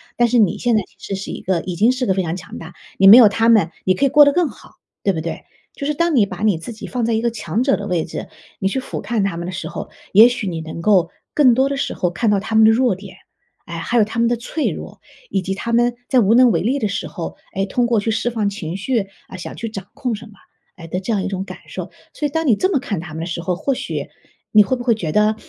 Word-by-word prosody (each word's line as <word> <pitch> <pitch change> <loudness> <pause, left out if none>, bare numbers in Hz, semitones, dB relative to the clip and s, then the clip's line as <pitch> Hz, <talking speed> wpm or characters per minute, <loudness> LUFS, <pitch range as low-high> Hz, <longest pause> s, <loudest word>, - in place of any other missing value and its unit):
但 240 - +3
是 240 +1 +1
你 205 -1 +3
现 240 -2 +1
在 215 - +2
其 - - -30 0.2
实 190 - -6
是 - - -6
一 - - -6
个 180 -3 0
已 180 - -5
经 220 +8 +4
是 255 0 -2
个 190 - +2
非 190 - 0
常 170 0 -3
强 180 -1 -9
大， 165 +2 -10 0.3
你 195 - +7
没 220 +5 +11
有 235 - +9
他 225 +3 +2
们 200 -7 +4
你 185 -1 +3
可 275 - +1
以 - - +3
过 295 +2 +7
得 285 - +5
更 350 -4 +2
好， - - -16 0.3
对 195 - +2
不 160 - -3
对？ 165 - -6 0.3
就 280 - -5
是 300 - -1
当 340 -1 +1
你 215 -6 +4
把 205 - -7
你 200 -7 +2
自 225 +8 -7
己 215 - -9
放 245 -3 -2
在 230 - 0
一 220 - +1
个 235 -1 0
强 210 0 -2
者 270 +1 +3
的 205 0 -6
位 175 -3 0
置， 165 - -6 0.3
你 195 - 0
去 265 +7 -1
俯 - - -6
瞰 225 -4 -1
他 195 -4 -1
们 170 +1 -5
的 - - -4
时 185 +1 -5
候， - - -7 0.2
也 215 +4 +8
许 245 -5 -2
你 165 -2 -3
能 160 +1 -7
够 180 -4 +3 0.2
更 255 -6 +5
多 265 +2 +2
的 280 - -2
时 275 - -2
候 175 -1 -1
看 225 +4 0
到 205 - +3
他 215 +3 -6
们 220 - +7
的 220 - +7
弱 245 -1 +2
点， 190 -1 -12 0.5
哎， 170 -2 -7
还 235 +8 -1
有 220 - +6
他 220 +2 -4
们 235 - +3
的 240 - +1
脆 295 +6 -2
弱， - - -8 0.3
以 190 - 0
及 190 +1 -3
他 235 +4 -4
们 240 +1 +2
在 255 - +4
无 220 +1 +4
能 250 -1 +6
为 165 - +1
力 250 +8 0
的 215 - 0
时 200 - -3
候， 170 -4 -7 0.2
诶， 195 - 0
通 240 +5 0
过 230 -3 +2
去 225 +2 -1
释 235 +2 0
放 215 -4 -1
情 170 -4 -5
绪， 215 -1 -1 0.2
啊， - - -9
想 170 - -7
去 230 - -5
掌 195 -3 -8
控 255 -4 -2
什 215 - -10
么， 215 - -16 0.4
诶， 165 -2 -10
的 180 +3 -3
这 210 +5 -4
样 195 -3 0
一 - - -2
种 190 -1 -3
感 - - -9
受。 - - -6 0.2
所 295 - -2
以 - - -7
当 320 +2 -1
你 235 -6 +4
这 375 - +1
么 310 - +2
看 200 -8 -4
他 165 -2 -8
们 160 - -4
的 - - -3
时 170 -1 -4
候， 180 0 -1
或 270 +9 -1
许 - - -5 0.4
你 210 -1 +7
会 260 - 0
不 245 - -6
会 235 -2 +3
觉 170 -8 -3
得， 210 +1 +3
215 Hz, 325 characters per minute, -19 LUFS, 185-240 Hz, 0.5 s, 没